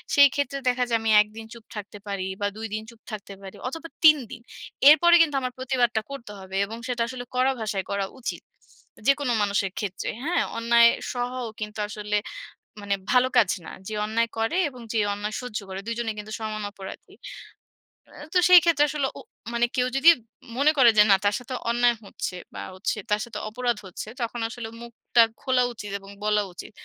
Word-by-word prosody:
সেইক্ষেত্রে 285 -1 +4
দেখা 250 0 +1
যায় 230 - +3
আমি 225 0 +1
১ 210 - -2
দিন 225 - -7
চুপ 235 - -13
থাকতে 210 0 -7
পারি 195 -2 -3
বা, - - +1
২ 225 0 -4
দিন 215 0 -3
চুপ 230 -1 -17
থাকতে 200 -2 -7
পারি 195 -1 -10
অথবা, 325 +4 -7 0.2
৩ 305 -1 +9
দিন। 235 - -8 0.5
এরপরে 345 +3 +7
কিন্তু 295 -4 +2
আমার 255 -1 -3
প্রতিবাদটা 245 -3 +1
করতে 235 -6 -8
হবে। 190 0 -9
এবং 225 +3 -8
সেটা 245 -2 -2
আসলে 250 0 -6
কড়া 255 +1 +3
ভাষায় 200 -3 -2
করা 200 -1 0 0.2
উচিত। - - -4 0.6
যেকোনো 275 -2 +3
মানুষের 200 -1 0
ক্ষেত্রে, 200 -3 -4
হ্যাঁ? 315 -3 +1
অন্যায় 235 0 +6 0.2
সহাও 245 0 -3
কিন্তু 210 0 -6
আসলে 210 0 -2 0.6
মানে 200 0 0 0.2
ভালো 250 0 +5
কাজ 200 - +5 0.2
না। - - -8 0.2
যে 220 - -5
অন্যায় 230 +2 0
করে 225 +10 0
এবং 255 -3 -12
যে 225 - +2
অন্যায় 210 +1 -4
সহ্য 250 -4 -4
করে, 190 0 -5
দুজনেই 230 -1 -2
কিন্তু 210 +1 -8
সমান 215 -1 -4
অপরাধী। 195 -2 -10 1.0
আ - - -21 0.2
তো 365 - +4
সেইক্ষেত্রে 335 -4 +7
আসলে 280 -1 -1
উ - - -9 0.3
মানে 235 0 +3
কেউ 250 0 +2
যদি 320 +5 +7 0.5
মনে 285 +3 +5
করে 250 -3 +7
যে 210 - +9
না - - +9
তার 205 0 +3
সাথে 250 +1 -8 0.2
অন্যায় 240 0 +3
হচ্ছে 185 - -5 0.2
বা, - - -6
হচ্ছে 190 +3 -2
তার 210 +1 +2
সাথে 225 -3 -7
অপরাধ 240 +1 -1
হচ্ছে, 185 - -7
তখন 235 +1 -3
আসলে 230 -1 -6
মুখটা 235 0 +1 0.2
খোলা 255 -2 +2
উচিত 205 -3 -8
এবং 195 0 -13
বলা 210 0 +2
উচিত। 175 - -9
235 Hz, 190 wpm, -25 LUFS, 210-255 Hz, 1.0 s, ৩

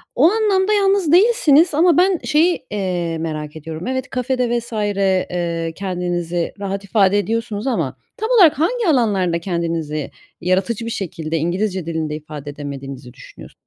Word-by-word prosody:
O 260 - +2
anlamda 420 -2 +2
yalnız 390 -5 +2
değilsiniz 355 - +5
ama 335 +1 +4
ben 365 -1 +3
şeyi, 325 +4 +2
eee, 180 -5 -2
merak 155 -2 -4
ediyorum, 160 +5 -7
evet, 260 +1 -2
kafe 255 0 -1
de 240 -1 +1
vs. 235 +1 -12
eee, 185 -5 -1
kendinizi 175 -2 -2
rahat 200 0 -3
ifade 200 0 +3
ediyorsunuz 225 +1 -2
ama 260 - -1 0.2
tam 440 +2 -3
olarak 360 - +5
hangi 455 +5 +1
alanlarda 200 - +2
kendinizi 165 -4 -3 0.3
yaratıcı 190 +6 0
bir 230 - -4
şekilde 165 -5 -3
İngilizce 185 +2 -1
dilinde 160 -2 -3
ifade 150 -1 -8
edemediğinizi 140 -3 -8
düşünüyors 130 - -13
195 Hz, 145 wpm, -19 LUFS, 165-275 Hz, 0.3 s, değilsiniz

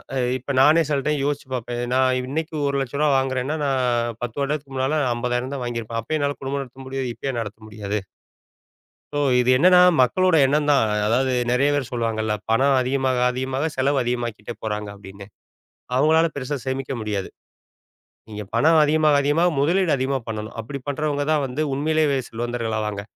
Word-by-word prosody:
அ - - 0 0.2
இப்ப 130 +3 -6
நானே 155 +5 +6
சில 145 -2 +1
டைம் 150 -2 0
யோசிச்சு 145 -2 -2
பார்ப்பேன். 120 -1 -4
இது, 120 - -2
நான் 130 0 +3
இன்னைக்கு 155 +4 -4
ரூ.1,00,000 140 +1 0
வாங்குறேன்னா, 130 +2 -1
நான் 120 -4 0
10 120 +2 -5
வருடத்துக்கு 140 -1 -3
முன்னால 135 +4 0 0.2
50,000 125 +2 -2
தான் 130 - -4
வாங்கியிருப்பேன். 115 -1 -4
அப்பயும் 155 +7 -2
என்னால 145 0 -1
குடும்பம் 140 +1 -2
நடத்த 130 +1 -13
முடியுது, 135 -1 -3
இப்ப - - -10
ஏன் 120 - -3
நடத்த 105 0 -7
முடியாது? 105 -1 -4 1.2
சோ - - 0 0.2
இது 125 0 +3
என்னென்னா, 180 +6 +6 0.2
மக்களோட 180 +7 +3
எண்ணம் 150 +2 +1
தான். 140 - +4 0.2
அதாவது 130 +4 +1 0.2
நெறைய 135 +4 +3
பேரு 140 -4 -1
சொல்லுவாங்கல்ல, 110 -3 -1 0.2
"பணம் 135 +4 +3
அதிகமாக 130 0 0
அதிகமாக 130 +3 -2
செலவு 135 +2 +1
அதிகமாக்கிட்டே 120 -3 -3
போறாங்க", 105 -1 -3
அப்படின்னு. 100 0 -12 0.7
அவங்களால, 160 +4 +4
பெருசா 140 +1 -3
சேமிக்க 130 0 -3
முடியாது. 105 -3 -3 1.0
நீங்க 105 -1 -6
பணம் 155 +7 +5
அதிகமாக 150 -1 +3
அதிகமாக 165 +5 +2
முதலீடு 175 +4 +2
அதிகமா 135 +1 -1
பண்ணணும். 110 -1 -5
அப்படி 140 +5 -7
பண்றவங்க 145 0 -1
தான் 150 -2 +2
வந்து, 130 +5 -3
உண்மையிலேயே 155 +2 +1
வெ 135 - +1
செல்வந்தர்கள் 115 -1 -3
ஆவாங்க. 105 -2 -3
130 Hz, 165 wpm, -22 LUFS, 120-145 Hz, 1.2 s, நானே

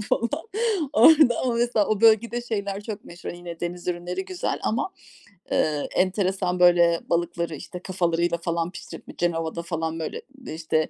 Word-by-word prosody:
falan. 230 +2 0 0.6
Orada 300 -6 +6
ama, 250 -2 0
mesela, 235 -3 +2
o 215 -2 0
bölgede 230 +2 +4
şeyler 200 -4 -3
çok 210 -1 -6
meşhur, 175 0 -8
yine, 175 -1 -9
deniz 175 +1 -4
ürünleri 180 +2 -3
güzel 185 -1 -3
ama, 235 +12 -1 0.6
eee, 150 -2 +1
enteresan, 185 -1 +1
böyle, 175 -1 +5
balıkları 170 -1 -1
işte 180 +5 -8
kafalarıyla, 175 -2 0
falan, 170 0 -2
pişirip - - -10
bi - - -11
Cenova'da, 165 -1 -1
falan, 165 -1 -3
böyle, 160 - -4 0.3
işte 155 0 -1
175 Hz, 150 wpm, -25 LUFS, 170-205 Hz, 0.6 s, Orada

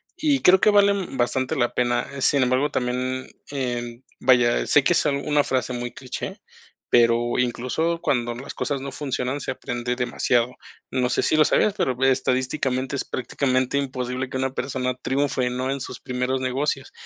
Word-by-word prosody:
y 300 -6 +1
creo 185 +1 +6
que - - +5
vale 200 -1 +5 0.2
bastante 125 +1 0
la 120 -1 +1
pena, 120 -1 0
eh, 140 - -6
sin 140 0 +4
embargo, 130 +3 +1
también, 130 +1 -2 0.2
em, 120 -3 -4 0.2
vaya, 120 -2 +4
sé 145 - +4
que 175 - +3
es - - +2
una 145 0 +1
frase 130 -2 -1
muy 120 0 -4
cliché, 130 -1 -6 0.5
pero, 120 0 +3
incluso 130 +7 -1
cuando 120 -3 0
las 130 +4 -8
cosas 140 -2 -2
no 140 0 -5
funcionan, 135 0 -3
se - - -3
aprende 125 -2 -3
demasiado. 125 0 0 0.4
No 125 -1 +1
sé, - - +1
si - - +2
lo 155 -1 +5
sabías, 210 - +3
pero 130 - 0
estadísticamente 130 0 0
es 140 - -2
prácticamente 130 +1 -1
imposible 130 -2 -2
que 130 - -3
una 130 0 -1
persona 125 -1 -2
triunfe, 130 -1 0
¿no? 130 +1 -2
En 140 0 -3
sus - - -7
primeros 125 +1 -2
negocios, 135 +1 -1
130 Hz, 170 wpm, -23 LUFS, 125-140 Hz, 0.5 s, creo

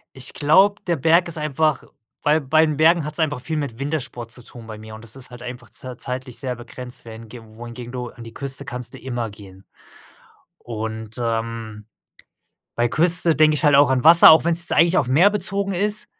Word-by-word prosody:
Ich 130 - -8
glaube, 190 +8 +3
der 170 - +1
Berg 165 +5 +3
ist 170 -1 -6
einfach 150 -1 0 0.4
weil 150 +2 +2
bei 155 +4 +3
den 155 -1 -2
Bergen 160 +1 +3
hat 150 - -5
es 155 - -6
einfach 150 -4 0
viel 160 +5 -4
mit 140 -6 -4
Wintersport 135 -5 -4
zu 125 - -11
tun 115 -1 -12
bei 110 -1 -8
mir 110 0 -11
und 110 - -10
das 115 +1 -5
ist 135 -2 -6
halt 125 -1 -11
einfach 120 -2 -9
z 125 +3 -9
zeitlich 125 -1 -6
sehr 130 -2 -3
begrenzt, 125 +1 -8
während 115 0 -11
g 120 +1 -11
wohingegen 120 +2 -10
du 125 -1 -5
an 115 - -13
die 115 - -11
Küste 140 +1 -3
kannst 125 -2 -6
du - - -9
immer 120 -3 -4
gehen. 100 -2 -15 1.0
Und, 110 -1 -5
ähm, 115 -2 -4 0.9
bei 120 0 +1
Küste 170 +3 +4
denke 155 +1 +4
ich 150 - -3
halt 145 -2 +5
auch 140 -1 +5
an 130 0 0
Wasser, 165 +1 +9
auch 160 - +6
wenn 170 - +2
es 170 - +2
jetzt 170 - -1
eigentlich 170 +3 +4
auf 135 - 0
Meer 165 +10 +5
bezogen 200 -1 -2
ist, 210 +3 -1
130 Hz, 220 wpm, -21 LUFS, 115-160 Hz, 1.0 s, Wasser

